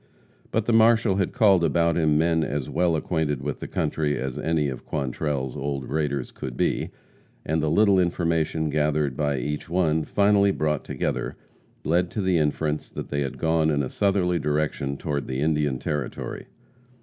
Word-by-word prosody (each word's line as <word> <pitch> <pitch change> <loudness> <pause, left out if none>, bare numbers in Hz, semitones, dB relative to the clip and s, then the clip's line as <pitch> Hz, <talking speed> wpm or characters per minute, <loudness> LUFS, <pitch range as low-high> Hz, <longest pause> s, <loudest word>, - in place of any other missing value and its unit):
But 110 -1 0
the 120 - +1
marshal 110 -3 +4
had 95 -3 0
called 100 -8 +4
about 85 0 +2
him 75 -3 +3
men 80 0 +2
as 70 -3 -2
well 90 -2 +1
acquainted 75 -4 -1
with 75 0 -3
the - - -6
country 75 -2 -1
as 65 +2 -4
any 80 -2 +1
of 65 -3 -5
Quantrell's 70 -2 -2
old 70 -2 -3
raiders 70 -3 -2
could 65 -2 -7
be, - - 0 0.6
and 80 +1 0
the 75 - 0
little 100 +3 +4
information 80 -3 0
gathered 75 -2 +1
by 70 -1 0
each 75 +5 -4
one, 80 -3 +1
finally 100 +3 +3
brought 75 -5 0
together, - - -3 0.5
led 90 +2 +1
to 105 - -3
the 95 -3 +2
inference 75 0 -1
that - - -7
they 70 0 -1
had 70 -2 -3
gone 80 -1 +2
in 70 -2 +1
a 65 - -3
southerly 95 -4 +1
direction 75 -2 -1
toward 70 -3 -3
the 65 0 -3
Indian 75 -3 +1
Territory. 75 -1 -4
75 Hz, 175 wpm, -25 LUFS, 70-85 Hz, 0.6 s, marshal